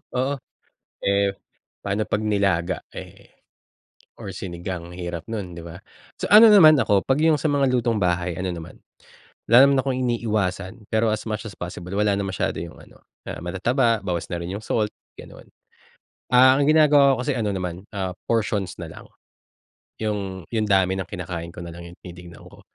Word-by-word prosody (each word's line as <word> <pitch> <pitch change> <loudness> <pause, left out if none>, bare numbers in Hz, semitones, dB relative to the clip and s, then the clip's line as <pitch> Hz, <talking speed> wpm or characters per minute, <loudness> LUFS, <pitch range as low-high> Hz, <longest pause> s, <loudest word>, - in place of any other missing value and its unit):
oo. 130 +3 0 0.7
Eh, 100 0 +2 0.5
paano 100 +2 -1
kapag 105 - -1
nilaga 100 -4 0
eh, - - -11 0.9
or 100 -5 -7
sinigang, 85 -1 -6
hirap 85 0 -6
nu'n 100 -6 -5
diba? 85 0 -9 0.4
So - - -4
ano 220 +1 +10
naman 155 -9 +7
ako 100 -2 +2
kapag 135 +3 +1
'yung 155 - +3
sa - - -8
mga 140 -3 +2
lutong 120 -4 0
bahay, 90 0 0
ano 90 +2 -3
naman, 85 -2 -8 0.7
wala 120 - +7
naman 140 -1 +3
akong 130 -1 -2
iniiwasan 105 -4 -2
pero 110 0 +1
as 110 - -5
much 110 +2 -4
as 100 - -7
possible 90 +1 -7
wala 105 0 +2
na 100 - -2
masyado 95 -1 -2
'yung 85 -1 -8
ano, - - -19 0.3
ah, - - -5
matataba, 115 +6 0
bawas 90 -4 -3
na 85 - -3
rin 85 +2 -5
,yung 110 - -11
salt, 105 -2 0 0.3
ganon. - - -12 0.9
Ah, 130 +2 +7
ang 145 - +2
ginagawa 150 -3 +5
ko - - -2
kasi 145 - 0
ano 105 -2 -1
naman, 90 +1 -5
ah, 95 -2 -2 0.2
portions 105 -4 -1
nalang. - - -9 1.0
'Yung 100 -4 -3
'yung 110 -2 0
dami 95 -2 +3
ng 95 - -4
kinakain 85 -3 -6
ko 85 - -7
nalang 85 0 -9
'yung 85 - -14
tinitignan 90 -1 -12
ko. - - -16
100 Hz, 170 wpm, -23 LUFS, 90-115 Hz, 1.0 s, ano